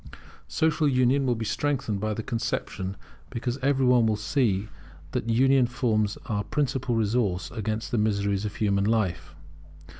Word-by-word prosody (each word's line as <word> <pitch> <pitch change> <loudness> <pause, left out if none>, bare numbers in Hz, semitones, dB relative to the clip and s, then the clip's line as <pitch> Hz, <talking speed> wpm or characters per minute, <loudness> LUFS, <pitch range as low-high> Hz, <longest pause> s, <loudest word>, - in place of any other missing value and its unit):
Social 160 -1 +1
union 130 +1 +3
will 120 - +2
be 110 0 -4
strengthened 135 -6 -1
by 110 +1 -1
the 110 - -4
conception, 100 -5 -3 0.3
because 120 +2 -3
every 135 0 +2
one 125 -2 +5
will 110 - +2
see 105 -2 0 0.4
that 115 - -2
union 130 +2 +4
forms 115 -5 0
our 105 -2 -1
principal 130 0 -1
resource 105 -4 0
against 110 -1 -3
the 120 - +1
miseries 100 -2 0
of 105 - -4
human 100 -2 +1
life. 95 -9 -1
115 Hz, 150 wpm, -26 LUFS, 105-130 Hz, 0.4 s, one